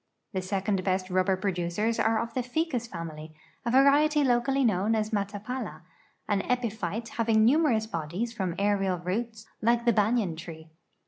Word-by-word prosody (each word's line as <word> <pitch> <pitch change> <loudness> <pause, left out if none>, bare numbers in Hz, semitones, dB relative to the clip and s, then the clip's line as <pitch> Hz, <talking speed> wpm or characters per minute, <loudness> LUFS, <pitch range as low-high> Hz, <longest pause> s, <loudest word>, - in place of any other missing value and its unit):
The 190 - -1
second 195 0 -1
bi 185 -1 +2
st 185 0 -10
rub 185 0 +2
ber 190 -1 +2
producers 190 +4 -1
are 225 0 +2
of 230 0 -4
the 255 - 0
ficus 250 -1 -2
ftimily, 160 -4 -7 0.3
a - - -1
variety 285 +4 +5
locally 265 +1 +2
known 210 +1 +2
as 215 0 -1
matapala.an 205 0 -4
epyphite 225 -2 -2
having 220 -1 +2
numerous 250 -4 +3
l)odies 180 +5 -4
from 185 -6 -2
aerial 195 -2 +1
roots 220 +5 -4 0.2
(like 235 +1 +2
thebanyan 215 -5 +2
tree). 160 -1 -10
215 Hz, 150 wpm, -28 LUFS, 185-235 Hz, 0.3 s, variety